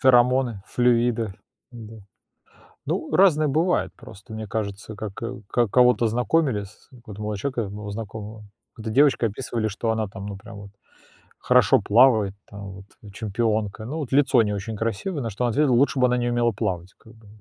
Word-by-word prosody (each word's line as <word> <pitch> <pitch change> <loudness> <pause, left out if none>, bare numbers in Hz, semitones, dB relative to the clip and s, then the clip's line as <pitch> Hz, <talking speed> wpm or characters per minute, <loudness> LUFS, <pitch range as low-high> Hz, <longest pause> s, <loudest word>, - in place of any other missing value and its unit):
Ферамоны, 125 -4 +3
флюиды, 120 -3 +1 0.4
да. 115 -2 -11 0.9
Ну, - - -2
разное 155 -6 +4
бывает 165 +6 +1
просто, 110 +2 -12
мне 110 0 -5
кажется, 105 0 -5
как, 105 0 -7
э, 115 -2 -5
ка 120 -1 +2
кого-то 125 0 +4
знакомили 125 -1 +1
с 100 - -18
вот 120 -5 -12
у - - -6
молодого 105 -1 -3
человека 130 +1 -2
моего 105 0 -7
знакомого, 110 0 -7 0.3
какой-то 110 0 -6
девочкой 130 -3 +3
описывали, 115 -1 -3
что 110 +2 -2
она 110 -1 0
там 95 +1 -9
ну 100 - -6
прям 100 +1 -12
вот 100 0 -10 0.7
хорошо - - +4
плавает, 110 -3 +4 0.2
там 100 -1 -8
вот 95 0 -11 0.3
чемпионка, 110 0 -2
ну 145 +7 -5
вот 140 -5 -5
лицо 135 -4 +4
не 105 -1 -2
очень 105 +2 -5
красивое, 115 - -2
на 115 - -3
что 105 +5 -4
он 120 - +1
ответил: 140 +1 +2
"Лучше 130 +2 +3
бы 125 - +5
она 125 - +1
не 120 0 0
умела 120 -1 +2
плавать, 95 -4 -3
как 110 - -18
бы". 110 -2 -19
115 Hz, 185 wpm, -24 LUFS, 105-125 Hz, 0.9 s, бы